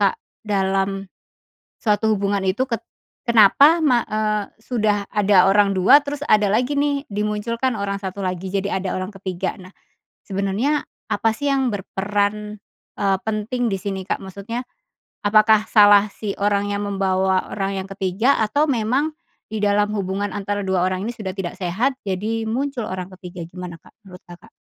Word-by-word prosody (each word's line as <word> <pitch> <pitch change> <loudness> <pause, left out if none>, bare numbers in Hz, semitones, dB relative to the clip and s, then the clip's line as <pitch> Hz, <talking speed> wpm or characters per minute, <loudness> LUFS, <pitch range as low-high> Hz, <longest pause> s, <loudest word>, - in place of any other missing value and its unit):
Kak, 200 -2 +3 0.3
dalam 195 -1 0 0.8
suatu 215 0 +2
hubungan 200 -1 0
itu? 190 +8 +1
Ket 230 -2 -2 0.4
kenapa 270 - +6
ma 245 -4 +4
eee, 215 -1 0 0.2
sudah 210 -4 0
ada 200 -3 +5
orang 200 0 +4
2, 200 +11 +7
terus 285 0 -4
ada 210 -6 +4
lagi, 250 +6 +1
nih, 285 0 0
dimunculkan 210 +4 -1
orang 200 0 -2
1 195 0 -5
lagi. 185 0 -3
Jadi 195 0 0
ada 190 -1 -2
orang 185 +1 -4
ke-3. 190 -1 -3
Nah, 185 +1 -14 0.5
sebenernya 200 +9 -1 0.3
apa, 220 +2 +2
sih, 285 +3 -2
yang 265 -2 +1
berperan, 205 +2 -2 0.4
eee, 195 -2 +2
penting 220 +3 -1
di - - +1
sini, 195 -2 -4
Kak? - - -2
Maksudnya, 200 +6 -6 0.6
apakah 215 +1 +5
salah 205 -1 +6
si 205 -2 -4
orang 205 0 +1
yang 200 - -2
membawa 190 -1 +1
orang 195 -1 -2
yang 190 - -8
ke 195 - -8
3 195 +9 +2
atau 285 +8 +2
memang 260 +5 0 0.4
di 215 - -2
dalam 205 0 +3
hubungan 200 +1 -2
antara 205 0 -2
2 185 -2 +1
orang 185 +2 -1
ini 235 - -3
sudah 210 -5 -6
tidak 180 -3 -3
sehat, 200 +9 0
jadi 210 +4 -2
muncul 265 +1 -2
orang 185 -1 -4
ke-3? 180 -2 -8
Gimana, 180 -1 -8
Kak, - - -21
menurut 180 -2 -13
Kakak? 175 +6 -14
205 Hz, 165 wpm, -21 LUFS, 195-220 Hz, 0.8 s, 2